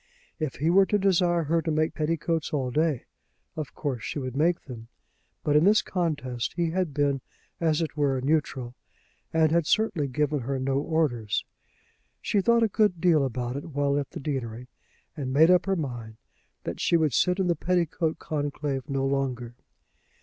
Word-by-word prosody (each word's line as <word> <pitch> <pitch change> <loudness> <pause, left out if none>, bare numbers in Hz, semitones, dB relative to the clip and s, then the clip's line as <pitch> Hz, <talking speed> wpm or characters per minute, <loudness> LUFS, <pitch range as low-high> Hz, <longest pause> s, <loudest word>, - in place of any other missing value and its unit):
If 155 -4 -2
he 155 +5 +1
were 190 +1 +5
to 210 - +2
desire 180 -3 +2
her 165 +2 +1
to 160 - -3
make 155 0 +1
petticoats 160 0 -1
all 130 -4 -1
day, 155 -2 0 0.5
of 155 -3 -6
course 135 -6 -3
she - - -4
would 130 -2 -4
make 165 +4 +2
them; 115 -4 -9 0.6
but 150 - +1
in 150 - +6
this 210 +3 +5
contest 145 -9 -2
he 170 -2 0
had 180 -2 -1
been, 140 -1 0 0.4
as 160 -1 +2
it 155 - -5
were, 140 -3 +1
neutral, 135 -3 -1 0.6
and 160 -1 +3
had 170 -2 +2
certainly 205 -10 +1
given 150 +2 0
her 135 +2 -2
no 135 +1 0
orders. 145 -9 0 0.7
She 205 - +1
thought 235 +3 +4
a - - +4
good 210 -4 +1
deal 165 -4 +4
about 125 -1 -3
it 140 - -5
while 140 0 +1
at 140 - -4
the 170 - -7
deanery, 125 -4 -4 0.5
and 135 -4 -4
made 160 +6 +6
up 180 +1 +4
her 195 - +2
mind 120 -8 -5 0.5
that - - -5
she 170 - +3
would 155 -5 +1
sit 180 - +2
in 190 - +1
the 175 -1 +2
petticoat 170 -1 0
conclave 145 -3 -3
no 135 -1 0
longer. 130 -3 -1
150 Hz, 180 wpm, -27 LUFS, 135-170 Hz, 0.7 s, in